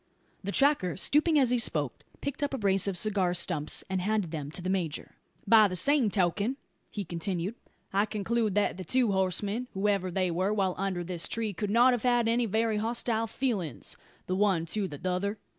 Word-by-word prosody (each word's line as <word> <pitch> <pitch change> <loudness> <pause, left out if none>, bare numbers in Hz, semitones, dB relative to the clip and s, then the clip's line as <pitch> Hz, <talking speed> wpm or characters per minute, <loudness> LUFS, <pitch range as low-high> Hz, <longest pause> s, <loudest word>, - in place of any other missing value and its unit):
The 200 - -3
tracker, 275 - +2
stooping 305 - +3
as 260 -4 +3
he 250 - +2
spoke, 150 - -1 0.2
picked 280 0 -4
up 285 -1 -1
a - - -3
brace 195 -3 +3
of 195 -2 -2
cigar 190 -3 0
stumps, 170 -3 0
and 190 -1 -2
handed 205 -3 -1
them 150 -3 -5
to 180 +4 -4
the - - -3
major. 180 -5 -3 0.3
"By 215 0 +6
the 185 - -4
same 265 - +3
token," 200 +6 0 0.3
he 205 -2 -5
continued, 175 +3 -3 0.4
"I 200 +2 +2
conclude 215 0 -1
that 205 -3 +1
the 185 - -6
two 245 +4 +2
horsemen, 200 +5 -1
whoever 195 -1 0
they 185 0 0
were, 185 +5 0
while 190 -3 +1
under 190 -2 -2
this 175 -1 -2
tree 220 -2 -3
could 205 +3 -3
not 240 +4 +5
have 245 - -1
had 240 -1 +2
any 235 +1 +1
very 220 +1 0
hostile 225 0 -1
feelins, 210 - -3 0.3
the 185 - -2
one 190 -4 +2
to 210 -3 -1
the 145 -4 -8
tother. 185 +5 -2
200 Hz, 195 wpm, -29 LUFS, 185-225 Hz, 0.4 s, By